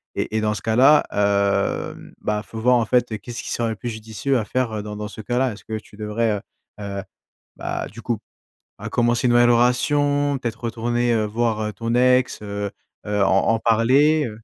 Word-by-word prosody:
et 110 Hz, -, -2 dB
et -, -, +1 dB
dans 105 Hz, 0 st, +1 dB
ce -, -, -5 dB
cas-là, 130 Hz, +7 st, +5 dB
hem, 100 Hz, -1 st, 0 dB
bah, 105 Hz, 0 st, -1 dB
faut 110 Hz, 0 st, -8 dB
voir 125 Hz, +2 st, +4 dB
en 115 Hz, -, +1 dB
fait 120 Hz, -2 st, +1 dB
qu'est-ce 120 Hz, +3 st, -7 dB
qui -, -, -5 dB
serait 115 Hz, -1 st, 0 dB
le -, -, -4 dB
plus 120 Hz, +3 st, -5 dB
judicieux 110 Hz, +4 st, -2 dB
à 110 Hz, -, -3 dB
faire, 130 Hz, -1 st, -1 dB
heu, 105 Hz, -, -3 dB
dans 105 Hz, 0 st, -6 dB
dans 105 Hz, 0 st, -5 dB
ce 110 Hz, -, -9 dB
cas-là? 125 Hz, +3 st, 0 dB
Est-ce 105 Hz, -, -13 dB
que 110 Hz, -, -3 dB
tu 105 Hz, -1 st, -14 dB
devrais, 110 Hz, +1 st, -1 dB
heu -, -, -8 dB, 0.4 s
heu, 100 Hz, -1 st, -4 dB, 0.5 s
bah, -, -, -4 dB
du -, -, -12 dB
coup, -, -, -1 dB, 0.6 s
à -, -, -6 dB
commencer 120 Hz, 0 st, +1 dB
une 120 Hz, -, +3 dB
nouvelle 120 Hz, 0 st, +5 dB
relation, 145 Hz, +4 st, +2 dB
peut-être 115 Hz, -3 st, -4 dB
retourner, 120 Hz, +1 st, 0 dB
heu, 110 Hz, -2 st, +1 dB
voir, 110 Hz, 0 st, -1 dB
heu, 105 Hz, -1 st, -3 dB
ton 115 Hz, +1 st, -2 dB
ex, 125 Hz, 0 st, +3 dB
heu 100 Hz, 0 st, -3 dB, 0.4 s
heu, 105 Hz, -1 st, +1 dB
en 95 Hz, 0 st, +3 dB
en 115 Hz, 0 st, +2 dB
parler? 130 Hz, +6 st, +3 dB
115 Hz, 210 wpm, -22 LUFS, 105-125 Hz, 0.6 s, cas-là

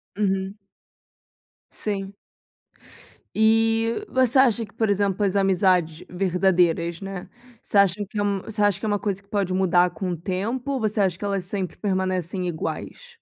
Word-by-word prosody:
Uhum. 195 Hz, 0 st, -1 dB, 1.1 s
Sim. 195 Hz, -2 st, -4 dB, 1.2 s
E 225 Hz, -, +3 dB
você 260 Hz, 0 st, +3 dB
acha 235 Hz, -3 st, +4 dB
que, 205 Hz, -, -21 dB
por 220 Hz, -2 st, 0 dB
exemplo, 200 Hz, 0 st, +1 dB
as 195 Hz, +1 st, 0 dB
amizades 185 Hz, -4 st, +2 dB
verdadeiras, 180 Hz, -2 st, +1 dB
né, 195 Hz, -1 st, -7 dB, 0.3 s
você 205 Hz, -, -2 dB
acha 200 Hz, +1 st, +3 dB
que 215 Hz, -, -7 dB
é -, -, +1 dB
um 200 Hz, -2 st, 0 dB
você 215 Hz, -1 st, -4 dB
acha 205 Hz, -3 st, +3 dB
que -, -, -5 dB
é -, -, 0 dB
uma 205 Hz, -1 st, +1 dB
coisa 195 Hz, -2 st, -2 dB
que 200 Hz, -, -32 dB
pode 195 Hz, -3 st, -1 dB
mudar 180 Hz, -1 st, +3 dB
com 180 Hz, +2 st, -4 dB
o 170 Hz, -, -3 dB
tempo 215 Hz, -, -3 dB
ou 265 Hz, -, -1 dB
você 215 Hz, -1 st, 0 dB
acha 185 Hz, -3 st, +1 dB
que 205 Hz, -, -5 dB
elas 195 Hz, -2 st, -1 dB
sempre 190 Hz, -1 st, -4 dB
permanecem 185 Hz, -2 st, -1 dB
iguais? 475 Hz, -, -5 dB
195 Hz, 170 wpm, -24 LUFS, 185-215 Hz, 1.2 s, acha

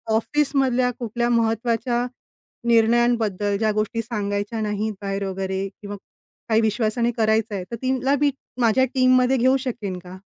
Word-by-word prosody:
ऑफिसमधल्यां 265 Hz, -1 st, +1 dB
कुठल्या 235 Hz, +1 st, -1 dB
महत्त्वाच्या 235 Hz, +1 st, +1 dB, 0.6 s
निर्णयांबद्दल 225 Hz, -3 st, +2 dB
ज्या 215 Hz, 0 st, +1 dB
गोष्टी 215 Hz, +2 st, -1 dB
सांगायच्या 210 Hz, -1 st, -3 dB
नाहीत 210 Hz, +1 st, -2 dB
बाहेर 195 Hz, 0 st, -3 dB
वगैरे 190 Hz, 0 st, -3 dB
किंवा 205 Hz, 0 st, -6 dB, 0.5 s
काही 220 Hz, +1 st, +4 dB
विश्वासाने 225 Hz, +2 st, +1 dB
करायचं 220 Hz, -1 st, +1 dB
आहे 185 Hz, -, -3 dB
तर -, -, -2 dB
तिला 260 Hz, +2 st, +1 dB
मी 290 Hz, -1 st, +4 dB, 0.3 s
माझ्या 235 Hz, +3 st, +4 dB
टीममध्ये 255 Hz, 0 st, +4 dB
घेऊ 260 Hz, +2 st, +4 dB
शकेन 220 Hz, -8 st, -4 dB
का? 180 Hz, +1 st, -11 dB
225 Hz, 135 wpm, -23 LUFS, 205-245 Hz, 0.6 s, काही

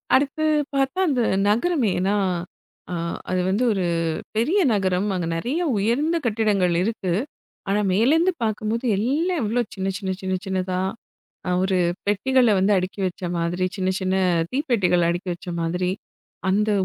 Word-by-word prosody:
அடுத்து 285 Hz, +3 st, +1 dB, 0.3 s
பார்த்தா? 270 Hz, +5 st, 0 dB
அந்த 260 Hz, -4 st, +1 dB, 0.3 s
நகரமே 240 Hz, -, +2 dB
ஏன்னா 190 Hz, +3 st, +1 dB, 0.8 s
அ -, -, -2 dB, 0.4 s
அது 185 Hz, -, +1 dB
வந்து 205 Hz, +6 st, +1 dB
ஒரு 190 Hz, -3 st, -1 dB, 0.5 s
பெரிய 280 Hz, -, +2 dB
நகரம். 190 Hz, -1 st, +1 dB
அங்க 175 Hz, -2 st, -2 dB
நெறைய 250 Hz, -, -1 dB, 0.2 s
உயர்ந்த 245 Hz, +11 st, +1 dB
கட்டிடங்கள் 210 Hz, -5 st, +2 dB
இருக்கு. 195 Hz, -4 st, -1 dB, 0.6 s
ஆனா 200 Hz, +1 st, +2 dB
மேலருந்து 315 Hz, -, +3 dB
பார்க்கும்போது 220 Hz, +2 st, -1 dB
எல்லாம் 310 Hz, -, 0 dB
எவ்ளோ 230 Hz, +4 st, +1 dB
சின்ன 190 Hz, -1 st, -2 dB
சின்ன 195 Hz, -2 st, -3 dB
சின்ன 190 Hz, 0 st, -2 dB
சின்னதா 185 Hz, -1 st, -1 dB, 0.7 s
அ -, -, +1 dB
ஒரு 190 Hz, -1 st, +1 dB, 0.3 s
பெட்டிகள 245 Hz, +4 st, +3 dB
வந்து 195 Hz, +2 st, +3 dB
அடுக்கி 185 Hz, +2 st, -4 dB
வச்ச 180 Hz, -, -6 dB, 0.2 s
மாதிரி. 175 Hz, +2 st, 0 dB
சின்ன 185 Hz, -1 st, -1 dB
சின்ன 185 Hz, 0 st, 0 dB, 0.4 s
தீப்பெட்டிகள் 215 Hz, -, +2 dB
அடுக்கி 175 Hz, +2 st, -2 dB
வச்ச 175 Hz, -, -12 dB
மாதிரி. 180 Hz, +2 st, -1 dB, 0.6 s
அந்த 210 Hz, +3 st, +2 dB
205 Hz, 140 wpm, -23 LUFS, 185-250 Hz, 0.8 s, மேலருந்து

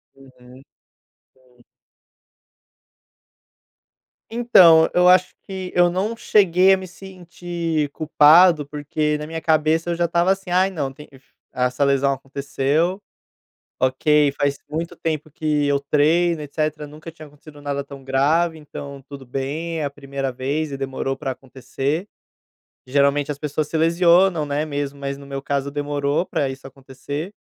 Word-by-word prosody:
Uhum, 135 Hz, -1 st, -18 dB, 0.9 s
hum. 125 Hz, -2 st, -28 dB, 2.7 s
Então, 185 Hz, -9 st, +6 dB
eu 180 Hz, 0 st, +4 dB
acho 185 Hz, 0 st, +4 dB
que 190 Hz, -2 st, -6 dB
eu 175 Hz, 0 st, +5 dB
não 195 Hz, +6 st, -2 dB
cheguei 190 Hz, -4 st, +4 dB
a -, -, +3 dB
me 190 Hz, 0 st, -8 dB
sentir 175 Hz, -4 st, -5 dB
culpado, 155 Hz, +1 st, +5 dB
porque 150 Hz, +1 st, -2 dB
na 150 Hz, -, -6 dB
minha 160 Hz, 0 st, -5 dB
cabeça 160 Hz, +1 st, +1 dB
eu 170 Hz, -, 0 dB
já 170 Hz, +1 st, +1 dB
estava 170 Hz, +2 st, +2 dB
assim: 195 Hz, -1 st, -3 dB
"Ai 185 Hz, +2 st, +3 dB
não, 145 Hz, -7 st, -4 dB, 0.6 s
essa 125 Hz, +2 st, 0 dB
lesão 140 Hz, 0 st, +2 dB
aconteceu, 140 Hz, +6 st, -2 dB, 0.8 s
ok, 145 Hz, +3 st, +2 dB
faz 140 Hz, -1 st, 0 dB
muito 165 Hz, +3 st, -4 dB
tempo 155 Hz, -2 st, -3 dB
que 150 Hz, -1 st, -1 dB
eu 140 Hz, 0 st, +2 dB
treino 155 Hz, +4 st, +2 dB
etcétera, 150 Hz, +1 st, -3 dB
nunca 155 Hz, +3 st, -11 dB
tinha 155 Hz, -1 st, -13 dB
acontecido 145 Hz, 0 st, -16 dB
nada 140 Hz, -1 st, -3 dB
tão 140 Hz, -1 st, -12 dB
grave, 155 Hz, +5 st, +1 dB
então 140 Hz, -2 st, -9 dB
tudo 140 Hz, -2 st, -10 dB
bem, 145 Hz, +6 st, -4 dB
é 150 Hz, -, -1 dB
a -, -, -2 dB
primeira 140 Hz, -1 st, -5 dB
vez 140 Hz, +5 st, -3 dB
e 140 Hz, -, -5 dB
demorou 135 Hz, 0 st, -3 dB
para 135 Hz, -1 st, -3 dB
acontecer". 135 Hz, -, -4 dB, 0.8 s
Geralmente 140 Hz, +2 st, +1 dB
as 145 Hz, -, -4 dB
pessoas 150 Hz, 0 st, -3 dB
se -, -, -3 dB
lesionam 170 Hz, 0 st, +3 dB
não 145 Hz, 0 st, -3 dB
é 150 Hz, -, 0 dB
mesmo, 145 Hz, -2 st, -4 dB
mas 140 Hz, 0 st, -5 dB
no 140 Hz, -, -12 dB
meu 135 Hz, 0 st, -6 dB
caso 140 Hz, 0 st, -2 dB
demorou 145 Hz, +1 st, -1 dB
para 140 Hz, -, -1 dB
isso 135 Hz, 0 st, -8 dB
acontecer. 135 Hz, +6 st, -7 dB
150 Hz, 145 wpm, -21 LUFS, 140-170 Hz, 2.7 s, Então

